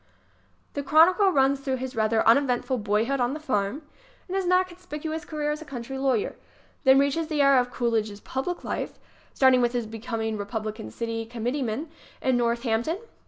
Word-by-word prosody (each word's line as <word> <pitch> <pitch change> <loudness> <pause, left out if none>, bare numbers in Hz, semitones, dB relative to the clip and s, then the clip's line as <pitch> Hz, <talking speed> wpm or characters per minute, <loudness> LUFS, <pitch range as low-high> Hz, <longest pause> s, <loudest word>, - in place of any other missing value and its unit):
The 285 - -2
chronicle 335 +8 +5
runs 275 -2 +3
through 270 -1 -2
his 260 0 -5
rather 220 0 +2
uneventful 255 +1 +3
boyhood 220 +6 0
on 245 +3 0
the - - -5
farm 255 -1 -1 0.4
and 375 - -4
his 385 -2 0
not 365 +1 +4
conspicuous 320 -3 -6
career 300 -1 -2
as 300 +1 -4
a - - -6
country 265 -1 -6
lawyer; 260 -6 0 0.5
then 265 0 +7
reaches 280 +4 +2
the 300 -3 +1
era 275 -2 +6
of 245 - -5
Cool 240 -1 -1
idge's 215 -2 -1
public 270 +11 -4
life - - -3
ŌĆö - - -31
starting 260 -2 +5
with 240 0 +1
his 240 -2 -1
becoming 225 0 -4
Re 205 - -4
publican 215 +1 -5
city 230 -1 -3
committeeman 245 +4 -3 0.3
in 260 -1 +1
Northampton. 235 +5 0
260 Hz, 180 wpm, -26 LUFS, 230-295 Hz, 0.5 s, then